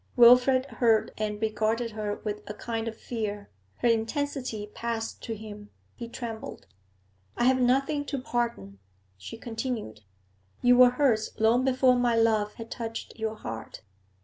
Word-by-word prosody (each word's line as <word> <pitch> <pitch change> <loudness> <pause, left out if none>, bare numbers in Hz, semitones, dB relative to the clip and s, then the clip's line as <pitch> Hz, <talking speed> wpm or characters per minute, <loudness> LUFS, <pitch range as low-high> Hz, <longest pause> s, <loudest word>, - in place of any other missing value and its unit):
Wilfrid 250 +2 +7
heard 230 -3 +2
and 210 -1 -2
regarded 220 +2 0
her 210 -1 -3
with 210 -1 -3
a 210 - -6
kind 225 0 -4
of 225 -1 -5
fear; 210 -4 -5 0.3
her - - +3
intensity 235 -1 -1
passed 230 -1 -4
to 225 - -4
him; 210 -1 -10 0.2
he 235 - -7
trembled. 230 -2 -7 0.7
'I - - +1
have 260 +1 +4
nothing 275 +4 +2
to 285 - -3
pardon,' 235 - -3 0.4
she 95 - -9
continued. 225 - -5 0.6
'You 245 0 +6
were 250 0 +8
hers 245 -4 +1
long 225 +3 +3
before 255 -1 +3
my 240 -1 +2
love 220 -2 +2
had 230 0 -9
touched 225 -1 -6
your 220 0 -2
heart. 115 - -7
230 Hz, 150 wpm, -28 LUFS, 215-245 Hz, 0.7 s, were